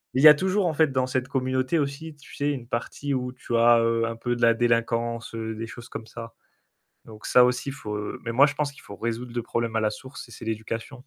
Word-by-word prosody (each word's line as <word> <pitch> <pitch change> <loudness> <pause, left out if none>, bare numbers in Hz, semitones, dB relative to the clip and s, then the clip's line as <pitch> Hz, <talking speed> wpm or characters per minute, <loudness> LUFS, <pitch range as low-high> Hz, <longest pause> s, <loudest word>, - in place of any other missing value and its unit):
y 135 +4 +8
a 150 - +12
toujours 190 +5 0
en 170 - +1
fait 155 -1 +3
dans 130 -1 +1
cette 130 0 -1
communauté 130 +2 0
aussi, 145 +2 -4
tu 145 - -16
sais, 145 +1 0
une 125 -5 -5
partie 135 +4 -3
où 125 -1 -2
tu 125 -1 -4
as, 115 0 +6
heu, 115 0 +1
un 115 0 -3
peu 120 +1 -2
de 120 - -7
la 115 0 +5
délinquance, 115 -1 0
des 110 0 -4
choses 120 0 -11
comme 110 - -7
ça. 115 0 -9 0.7
Donc 110 -1 -11
ça 125 - +6
aussi, 125 +2 0
il - - -6
faut 105 -6 -5
heu, 105 0 -5
mais 115 - -2
moi 135 +5 +6
je 145 - -3
pense 145 -1 -1
qu'il 140 - -16
faut 100 - -10
résoudre 115 +3 -4
le 120 - -1
problème 115 -1 -2
à - - +2
la 110 -1 +1
source 130 +7 -9
et - - -14
c'est 115 - -10
l'éducation. 110 +2 -4
120 Hz, 255 wpm, -25 LUFS, 115-135 Hz, 0.7 s, a